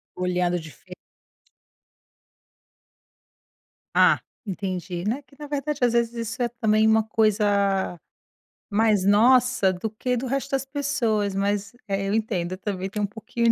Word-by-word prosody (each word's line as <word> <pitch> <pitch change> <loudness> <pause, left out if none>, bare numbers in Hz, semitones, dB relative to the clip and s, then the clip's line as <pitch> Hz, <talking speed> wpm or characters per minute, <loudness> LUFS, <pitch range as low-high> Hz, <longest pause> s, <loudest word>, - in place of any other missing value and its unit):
Olhando 180 -1 0
dife 165 +3 -12 3.0
Ah, - - +5 0.3
entendi. 185 -3 -4
Né, 245 +7 -1
que 280 - -23
na 295 - -7
verdade 290 0 -2
às 240 -1 +3
vezes 235 0 +1
isso 230 +1 -4
é 240 - +2
também 220 -2 +2
uma 220 0 +4
coisa 205 -4 +1 0.7
mais 210 -2 +3
nossa 235 0 +4
do 185 +5 -4
que 250 +4 -2
do 250 +2 -3
resto 275 +2 -2
das 270 -1 0
pessoas, 235 -8 0
mas, 200 +2 -1
é, 195 0 -1
eu 200 - 0
entendo, 205 -6 -1
eu 185 - -4
também 190 -1 -4
tenho 210 +1 -3
um - - +1
pouquinho 230 +3 0
215 Hz, 140 wpm, -24 LUFS, 195-240 Hz, 3.0 s, Ah